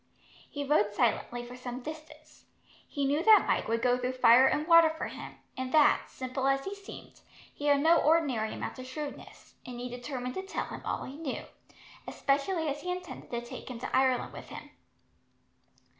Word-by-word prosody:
He 285 Hz, -, -4 dB
rode 210 Hz, -8 st, +2 dB
silently 240 Hz, +1 st, 0 dB
for 245 Hz, +1 st, -10 dB
some 250 Hz, 0 st, -6 dB
distance. 310 Hz, +1 st, -11 dB, 0.4 s
He 285 Hz, -1 st, -2 dB
knew 290 Hz, +3 st, +1 dB
that 435 Hz, +2 st, +7 dB
Mike -, -, +1 dB
would 230 Hz, +1 st, -1 dB
go 250 Hz, 0 st, +3 dB
through 250 Hz, +1 st, -2 dB
fire 255 Hz, +1 st, +6 dB
and 300 Hz, -, 0 dB
water 335 Hz, -1 st, +7 dB
for 320 Hz, 0 st, -4 dB
him, -, -, -9 dB, 0.2 s
and 260 Hz, 0 st, -4 dB
that, 305 Hz, -2 st, +5 dB
simple 260 Hz, +1 st, -3 dB
as 275 Hz, 0 st, +1 dB
he 390 Hz, -, -4 dB
seemed, 400 Hz, -1 st, -12 dB, 0.3 s
he 290 Hz, -, -4 dB
had 285 Hz, -1 st, +4 dB
no 330 Hz, +2 st, +5 dB
ordinary 290 Hz, -10 st, +2 dB
amount -, -, -6 dB
of 255 Hz, -, -8 dB
shrewdness; 290 Hz, +2 st, -8 dB
and 250 Hz, -1 st, -8 dB
he 250 Hz, +1 st, -5 dB
determined 250 Hz, +1 st, -5 dB
to 380 Hz, -, -3 dB
tell 385 Hz, -, -4 dB
him -, -, -8 dB
all -, -, -2 dB
he 275 Hz, -, -8 dB
knew, 305 Hz, -5 st, -5 dB, 0.6 s
especially 315 Hz, +4 st, 0 dB
as 290 Hz, 0 st, -3 dB
he 360 Hz, -, -5 dB
intended 360 Hz, -1 st, -7 dB
to 235 Hz, -1 st, -3 dB
take 240 Hz, -, -9 dB
him 250 Hz, -, -6 dB
to 235 Hz, -, -4 dB
Ireland 260 Hz, -2 st, +2 dB
with -, -, -10 dB
him. -, -, -10 dB
270 Hz, 190 wpm, -30 LUFS, 250-310 Hz, 0.6 s, that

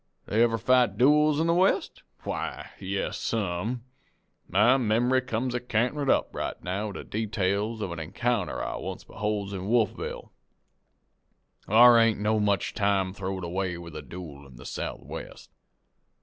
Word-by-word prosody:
"Do -, -, -15 dB
they 110 Hz, -, +4 dB
ever 115 Hz, -1 st, +3 dB
fight 125 Hz, -4 st, +3 dB
dooels 150 Hz, +4 st, +4 dB
in 160 Hz, -, +2 dB
the 170 Hz, -, +3 dB
West? 185 Hz, +3 st, +1 dB, 0.2 s
Why, -, -, -4 dB
yes 95 Hz, +1 st, -3 dB
some. 110 Hz, +3 st, -2 dB, 0.7 s
My 105 Hz, +7 st, +5 dB
mem'ry 125 Hz, +2 st, +2 dB
comes 125 Hz, 0 st, -2 dB
a 125 Hz, -, 0 dB
canterin' 125 Hz, +4 st, 0 dB
up -, -, +2 dB
right -, -, -4 dB
now 100 Hz, +4 st, -2 dB
with 100 Hz, -, -7 dB
the -, -, -6 dB
details 105 Hz, +1 st, -1 dB
of 95 Hz, -, -3 dB
an 85 Hz, -, -5 dB
encounter 115 Hz, +10 st, -1 dB
I -, -, -3 dB
once -, -, -6 dB
beholds 105 Hz, -2 st, -3 dB
in 95 Hz, 0 st, -5 dB
Wolfville. 115 Hz, 0 st, -1 dB, 1.4 s
Thar 120 Hz, +3 st, +8 dB
ain't 115 Hz, -2 st, +3 dB
no 110 Hz, +1 st, +1 dB
time 105 Hz, -, +1 dB
much 100 Hz, -3 st, 0 dB, 0.4 s
throwed 95 Hz, -1 st, -4 dB
away 90 Hz, +1 st, -2 dB
with 85 Hz, -2 st, -10 dB
a 75 Hz, -, -5 dB
dooel 75 Hz, -3 st, -10 dB
in 65 Hz, -, -16 dB
the -, -, -12 dB
Southwest. -, -, -7 dB
110 Hz, 160 wpm, -27 LUFS, 95-120 Hz, 1.4 s, Thar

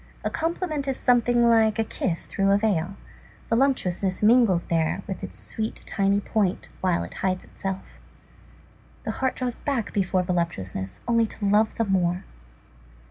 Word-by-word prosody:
A -, -, -1 dB
compliment 325 Hz, -3 st, -2 dB
is 270 Hz, -, 0 dB
something 240 Hz, -1 st, +3 dB
like 225 Hz, -2 st, +4 dB
a 225 Hz, -, +2 dB
kiss 180 Hz, -5 st, -2 dB
through 195 Hz, 0 st, 0 dB
a 200 Hz, -, +5 dB
veil. 195 Hz, -4 st, 0 dB, 0.5 s
Voluptuousness 210 Hz, -7 st, +1 dB
mingles 215 Hz, -6 st, +5 dB
there 165 Hz, +3 st, 0 dB
with 190 Hz, -, -6 dB
its -, -, -6 dB
sweet 220 Hz, 0 st, -3 dB
tiny 200 Hz, 0 st, +1 dB
point, 205 Hz, -2 st, -1 dB
while 180 Hz, -2 st, +1 dB
it -, -, -8 dB
hides 185 Hz, -1 st, -1 dB
itself. 195 Hz, -1 st, -5 dB, 1.2 s
The -, -, -2 dB
heart 260 Hz, -1 st, -1 dB
draws 250 Hz, -2 st, -1 dB
back 265 Hz, -7 st, -2 dB
before 185 Hz, -2 st, +1 dB
voluptuousness 130 Hz, -, -3 dB
only 230 Hz, -1 st, +3 dB
to 210 Hz, -, -5 dB
love 210 Hz, +2 st, +3 dB
the 230 Hz, -, 0 dB
more. 180 Hz, -2 st, +1 dB
205 Hz, 150 wpm, -25 LUFS, 185-235 Hz, 1.2 s, a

